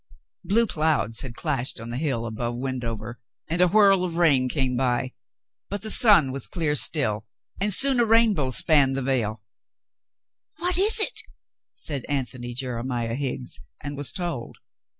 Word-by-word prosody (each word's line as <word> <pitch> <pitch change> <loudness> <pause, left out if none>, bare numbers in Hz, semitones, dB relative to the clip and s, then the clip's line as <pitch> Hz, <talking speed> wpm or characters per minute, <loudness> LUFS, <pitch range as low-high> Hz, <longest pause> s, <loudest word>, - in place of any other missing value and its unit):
Blue 210 +6 +2
clouds 155 - 0
had 125 -3 -8
clashed 130 0 -3
on 115 +1 -8
the 120 - -4
hill 130 -6 -2
above 120 +1 -4
Wend 130 -1 -4
over, 115 +1 -6 0.3
and 170 +3 -1
a 180 - +5
whirl 195 -1 +4
of 170 -2 -4
rain 140 -7 +3
came 130 -2 -1
by. 125 0 -1 0.6
But 205 0 -5
the 220 - +2
sun 195 - +6
was 135 +1 -4
clear 160 -5 -1
still, 115 -7 +2 0.3
and 205 +2 0
soon 265 +5 +4
a 240 - +3
rainbow 220 - +2
spanned 140 -2 +3
the 135 - -2
vale. 110 -5 -2 1.2
^'What 355 +1 +1
is 430 +3 +4
it?" 425 - +1 0.5
said 140 -5 -3
Antony 125 -3 -4
Jeremiah 120 -2 -3
Higgs, 130 - -4 0.2
and 145 0 -6
was 145 -1 -2
told. 170 -10 -5
135 Hz, 160 wpm, -24 LUFS, 120-180 Hz, 1.2 s, sun